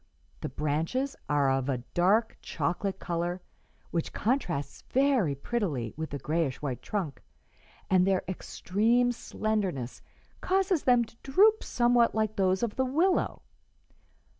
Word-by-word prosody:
The - - -4
branches 160 - -1
are 140 -2 +3
of 135 0 0
a 130 - +1 0.2
dark 205 +6 +3
chocolate 180 +6 -2
color 175 0 -2 0.5
which 165 -2 -2
contrasts 180 - -1
very 260 - +2
prettily 140 - -2
with 160 0 -4
the 140 - -4
grayish 150 -2 -1
white 135 -5 -4
trunk, 185 -9 -3 0.7
and 185 0 +4
their 190 -1 +2
extreme 225 +6 +1
slenderness 200 - -2 0.4
causes 380 -3 +1
them 245 -2 +5
to 225 - -19
droop 420 +11 +4
somewhat 240 -1 +3
like 215 -1 0
those 190 +1 +1
of 230 -3 -2
the 260 - +2
willow. 330 +9 +1
195 Hz, 130 wpm, -29 LUFS, 155-245 Hz, 0.7 s, them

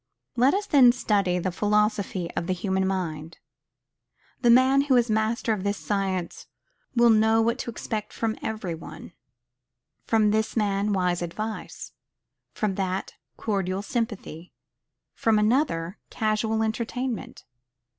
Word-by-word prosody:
Let 255 +7 +4
us 410 +1 -1
then 265 -9 +6
study 200 -7 +1
the 180 +1 -1
philosophy 210 -2 0
of 170 - -3
the 185 - +1
human 190 +1 -1
mind. 165 -4 -4 1.0
The 240 - +3
man 260 +3 +6
who 265 -3 +4
is 235 -2 +2
master 220 +1 +1
of 200 -3 -4
this 200 0 -1
science 190 -4 -3 0.5
will 235 -1 +6
know 220 +1 +4
what 230 +1 +1
to - - -4
expect 215 -2 -4
from 225 -1 -2
every 215 -6 -3
one. 165 +1 -10 0.9
From 215 -2 +3
this 220 +2 0
man, 205 -1 +1
wise 180 -3 0
advice; 215 +6 -5 0.6
from 210 -2 -1
that, 190 0 -3 0.2
cordial 195 -2 -2
sympathy; 210 -8 -4 0.6
from 225 -1 +2
another, 210 - +1
casual 220 0 0
entertainment. 235 +2 -3
215 Hz, 130 wpm, -25 LUFS, 190-225 Hz, 1.0 s, then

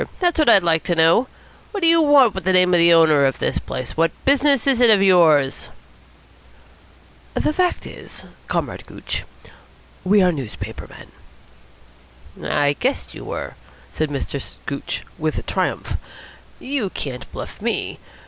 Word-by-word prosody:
That's 350 -3 +1
what 305 - +4
I'd 195 -5 +6
like 165 -1 +2
to 175 - 0
know. 165 +10 +3 0.4
What 405 - -5
do 335 - +3
you 330 0 +5
want 285 -7 +5
with 190 - -6
the 185 +1 +1
name 180 0 +4
of 175 - +4
the 170 0 +5
owner 160 -4 +5
of 135 - -3
this - - -2
place? 130 - -7
What 165 +1 +2 0.2
business 280 -2 +3
is 265 -3 +2
it 240 - +6
of 205 -3 +5
yours?" 160 -8 +3 1.7
"The 305 - 0
fact 360 +1 -1
is, - - -11 0.2
Comrade - - -4
Gooch, - - -6 0.8
we 205 +3 +3
are 180 - +3
newspaper 135 -9 -7
men." 60 +1 -15
"I 145 0 +2
guessed 260 - -3
you - - -10
were," - - -6 0.4
said 155 -1 -2
Mr. 140 -1 -4 0.2
Gooch 140 -1 -5 0.2
with 155 0 -3
triumph. - - -2 0.6
"You 260 -7 -3
can't 125 -8 -7
bluff - - -9
me. - - -2
180 Hz, 155 wpm, -20 LUFS, -, 1.7 s, I'd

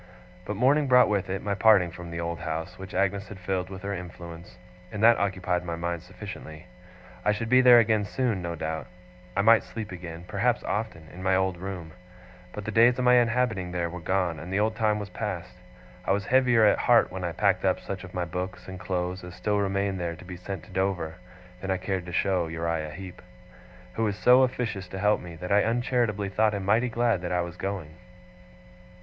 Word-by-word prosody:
But 105 - -3
morning 140 +6 +3
brought 125 -2 +6
with 100 -3 0
it 95 +1 -3
my 100 - -1
parting 95 -3 +5
from 85 0 -9
the 85 0 -5
old 85 0 -3
house, 80 +3 -4
which 95 -1 -8
Agnes 100 0 0
had 105 - -9
filled 90 0 -2
with 95 -1 -9
her 100 0 -2
influence; 85 -2 -9 0.3
and 105 +1 -4
that 115 0 +7
occupied 90 -3 -1
my 85 -1 -3
mind 85 0 -3
sufficiently. 90 -4 -9 0.6
I 105 - +3
should 110 +2 -3
be 130 +1 +6
there 125 -1 +8
again 110 -3 +3
soon, 115 -4 -1
no 85 -1 -4
doubt; 80 0 -4 0.5
I - - +4
might 115 +1 +7
sleep 110 -3 -7
again 85 -1 -8
perhaps - - 0
often 105 -7 -3
in 90 - -9
my 95 0 +2
old 95 -1 +1
room; 90 -2 -6 0.6
but 105 +1 -7
the 110 - -3
days 120 +3 +5
of 125 - 0
my 125 0 +6
inhabiting 115 -6 +1
there 85 -2 -1
were 90 - -6
gone, 90 -1 0
and 85 +3 -8
the 95 - +1
old 110 +1 +1
time 105 -1 +1
was 105 -1 -5
past. - - -4 0.5
I - - +1
was 100 0 -1
heavier 120 -1 +4
at 105 - +4
heart 120 -1 +4
when 95 0 -5
I 85 - -1
packed 95 +2 +1
up 95 -1 +2
such 100 -1 -6
of 90 - -10
my 90 -1 -1
books 90 +2 -5
and 95 -1 -7
clothes 90 -1 -3
as 90 0 -9
still 105 +1 0
remained 100 -1 0
there 85 -1 -3
to 90 - -13
be 90 0 -7
sent 90 -1 -6
to - - -15
Dover, 90 -3 -1 0.4
than 95 - -5
I 95 - +1
cared 95 -1 -3
to - - -6
show 90 -1 +1
to - - -8
Uriah 80 -1 -2
Heep; 95 +3 -9 0.7
who 115 - -1
was 105 -1 -1
so 125 +3 +6
officious 115 -7 -1
to 95 - -7
help 105 +2 +2
me, 85 -1 -9
that 90 +3 -6
I 100 +1 +5
uncharitably 115 -3 0
thought 105 +2 +2
him 100 -1 -4
mighty 115 +5 +3
glad 115 -4 +1
that 90 - -4
I 90 0 +1
was 85 0 -5
going. 90 -5 -4
95 Hz, 220 wpm, -27 LUFS, 90-105 Hz, 0.7 s, there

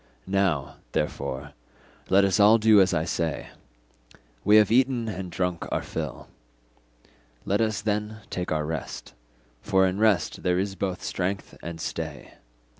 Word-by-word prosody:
Now, 95 -8 0 0.2
therefore, 70 +1 -3 0.6
let 100 +1 +5
us 95 0 +1
all 105 +2 +7
do 110 -2 +6
as 95 - +3
I 80 - +1
say; 85 -2 -2 0.9
we 105 - +5
have 105 -1 +6
eaten 125 -1 +3
and 95 -3 -5
drunk 90 0 -2
our - - -1
fill, - - -5 1.2
let 100 +3 +1
us 110 -2 0
then 105 +1 -2
take 90 -1 -3
our 75 -1 0
rest, 80 -5 -5 0.5
for 95 -2 +3
in 95 +1 -1
rest 105 -7 +2
there 90 0 +1
is 95 +1 -1
both 95 -1 -3
strength 95 +1 -3
and 85 0 -7
stay. 80 -5 -5
95 Hz, 145 wpm, -26 LUFS, 85-105 Hz, 1.2 s, all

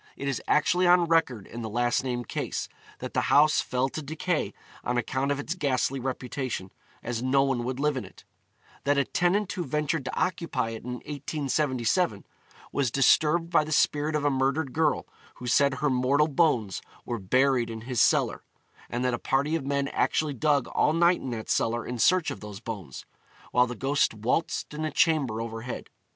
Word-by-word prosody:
It 140 - -4
is 135 - -1
actually 175 +4 +3
on 175 0 +6
record 160 - +1
in 120 - -8
the 110 - -4
last 120 +3 +1
named 120 -2 -3
case, - - -3 0.3
that - - -7
the - - +2
house 150 +1 +5
fell 130 +1 0
to 155 - -5
decay 155 +3 -2 0.3
on 125 - -1
account 130 +3 -1
of 140 - -1
its 155 - -3
ghastly 135 -5 0
reputation, 125 -5 -4 0.3
as 120 -1 -3
no 135 +2 +3
one 135 -3 0
would 130 +1 -3
live 150 0 +1
in 130 - -3
it; 95 - -14 0.6
that 145 0 +2
a 140 - +3
tenant 185 +6 +1
who 180 - -3
ventured 150 +1 -1
to 130 - -4
occupy 170 -10 -1
it 115 - -7
in 125 +1 -5
1877 140 - -1 0.5
was 140 -3 +1
disturbed 155 +6 +3
by 165 - +4
the 155 - -7
spirit 150 0 +2
of 150 -1 0
a 145 - +3
murdered 135 +1 0
girl 155 -1 +1 0.3
who 125 - -10
said 140 +2 +3
her 150 +2 0
mortal 130 +4 +3
bones 135 - +1 0.2
were 120 -1 -3
buried 130 +4 +2
in 110 -1 -6
his 120 0 -1
cellar; - - +2 0.5
and 125 +1 -2
that 125 - +1
a 120 - -2
party 140 +4 +1
of 145 -5 -3
men 140 0 0
actually 155 -2 0
dug 140 0 +1
all 150 - +2
night 170 +2 +3
in 130 - -5
that 115 -2 -5
cellar 115 +1 0
in 125 -1 -5
search 185 +6 +3
of - - -6
those 105 -2 -8
bones, 100 - -7 0.5
while 125 0 +4
the 125 - -5
ghost 135 0 +1
waltzed 120 +9 -1
in 155 +1 -4
a 155 - 0
chamber 145 -10 +2
overhead. 115 +1 -6
135 Hz, 195 wpm, -27 LUFS, 120-150 Hz, 0.6 s, on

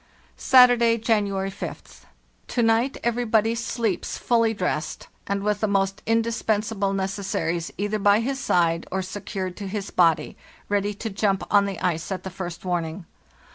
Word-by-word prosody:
"Saturday, 245 -3 +6
January 200 -4 0
5th. - - -9 0.4
To 240 - 0
night 230 +4 +2
everybody 230 -2 +2
sleeps 230 -3 -2
fully 230 -2 +2
dressed, 180 -6 -3 0.2
and 200 0 -1
with 210 0 0
the 215 - +1
most 195 -1 0
indispensable 225 -2 0
necessaries 190 -4 -2
either 205 +2 -1
by 205 +1 +4
his 265 +4 -2
side 170 -9 +1
or 190 0 -1
secured 185 -1 -5
to 200 - -5
his 200 0 -4
body, 165 -3 +2 0.3
ready 205 0 0
to 220 +2 -5
jump 195 -1 0
on 205 -1 +5
the 195 -3 -4
ice 170 0 -1
at 190 - -3
the 190 - -6
first 175 -1 -7
warning. 170 0 -2
200 Hz, 150 wpm, -24 LUFS, 190-225 Hz, 0.4 s, Saturday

